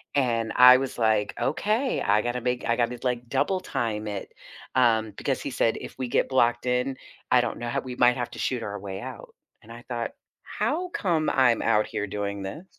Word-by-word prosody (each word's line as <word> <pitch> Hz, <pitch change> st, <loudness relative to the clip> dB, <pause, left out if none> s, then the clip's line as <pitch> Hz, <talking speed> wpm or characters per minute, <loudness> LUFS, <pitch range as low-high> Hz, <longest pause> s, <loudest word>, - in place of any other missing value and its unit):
And 115 Hz, -5 st, +1 dB
I 125 Hz, 0 st, +9 dB
was 135 Hz, -1 st, -4 dB
like, 110 Hz, -3 st, +2 dB
"Okay, 215 Hz, -, 0 dB
I 105 Hz, +1 st, +3 dB
gotta 120 Hz, +1 st, -2 dB
make 125 Hz, 0 st, -2 dB
I 115 Hz, -, +2 dB
gotta 120 Hz, 0 st, 0 dB
like 125 Hz, -1 st, -2 dB
double 190 Hz, +8 st, +1 dB
time 110 Hz, -9 st, -3 dB
it," 100 Hz, -2 st, -6 dB, 0.4 s
um, 110 Hz, -4 st, +3 dB
because -, -, -2 dB
he -, -, -4 dB
said, 115 Hz, -, +1 dB
"if -, -, -9 dB
we 130 Hz, -, -3 dB
get -, -, +1 dB
blocked 120 Hz, -2 st, +2 dB
in, 125 Hz, +1 st, 0 dB, 0.3 s
I 125 Hz, -1 st, +6 dB
don't 120 Hz, -, -3 dB
know 120 Hz, 0 st, -4 dB
how -, -, -1 dB
we 125 Hz, -1 st, -7 dB
might 125 Hz, 0 st, +4 dB
have 120 Hz, -1 st, -3 dB
to -, -, -9 dB
shoot 125 Hz, -3 st, -1 dB
our 105 Hz, 0 st, -5 dB
way 95 Hz, -1 st, -6 dB
out." -, -, -9 dB, 0.3 s
And 110 Hz, -, -15 dB
I 120 Hz, +1 st, -10 dB
thought, 120 Hz, -2 st, -3 dB, 0.3 s
"How 360 Hz, +4 st, -2 dB
come 170 Hz, -, 0 dB
I'm 125 Hz, -3 st, +3 dB
out 105 Hz, 0 st, +2 dB
here 105 Hz, -, -3 dB
doing 100 Hz, 0 st, -4 dB
this?" 95 Hz, -, -7 dB
120 Hz, 210 wpm, -26 LUFS, 110-130 Hz, 0.4 s, I